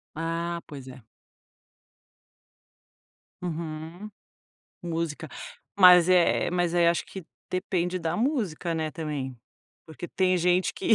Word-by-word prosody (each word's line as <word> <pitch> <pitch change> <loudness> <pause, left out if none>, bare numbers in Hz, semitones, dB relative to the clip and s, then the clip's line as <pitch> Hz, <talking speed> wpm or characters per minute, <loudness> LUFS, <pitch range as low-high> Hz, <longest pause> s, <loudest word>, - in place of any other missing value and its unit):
Ah, 170 +1 -3
pois 140 -4 -9
é. 130 -2 -11 2.4
Uhum. 165 +3 -5 0.7
Música. 165 -2 -3 0.5
Mas 180 -2 +8
é 180 -2 +3
mas 175 -1 0
aí 170 -1 +5
acho 170 - 0
que 190 -4 -9 0.3
depende 185 -1 -1
da 165 0 -2
música, 210 - -1
né, 160 -1 -2
também. 150 -5 -4 0.5
Porque 160 +2 -8
tem 185 -1 +2
gente 180 +1 +2
que 225 - +3
170 Hz, 110 wpm, -27 LUFS, 160-180 Hz, 2.4 s, Mas